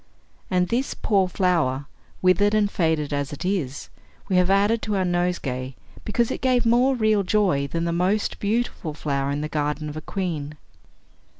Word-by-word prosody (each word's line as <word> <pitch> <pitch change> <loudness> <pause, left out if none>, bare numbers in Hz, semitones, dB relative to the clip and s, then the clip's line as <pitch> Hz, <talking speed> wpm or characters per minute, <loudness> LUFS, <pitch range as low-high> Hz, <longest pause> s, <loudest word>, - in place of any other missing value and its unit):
And 180 -3 +1
this 255 +4 -1
poor 195 -3 +2
flower, 165 -8 +1 0.4
withered 205 +3 +4
and 205 -1 +2
faded 160 -4 0
as 145 0 -2
it 145 +4 -6
is, 165 -8 -2 0.4
we 185 - +2
have 180 0 +3
added 205 +3 +3
to 210 -2 -2
our 190 -1 +1
nosegay, 170 -8 -1 0.3
because 230 +2 0
it - - -4
gave 255 -2 +2
more 245 +3 +4
real 215 -3 +2
joy 185 -8 +1
than 165 +3 -2
the 170 0 -1
most 185 +5 0
beautiful 205 -7 -2
flower 140 -2 -1
in 145 +1 -2
the 150 - -2
garden 150 0 -2
of 150 - -7
a - - -5
queen." 155 -5 -4
180 Hz, 175 wpm, -24 LUFS, 150-205 Hz, 0.4 s, withered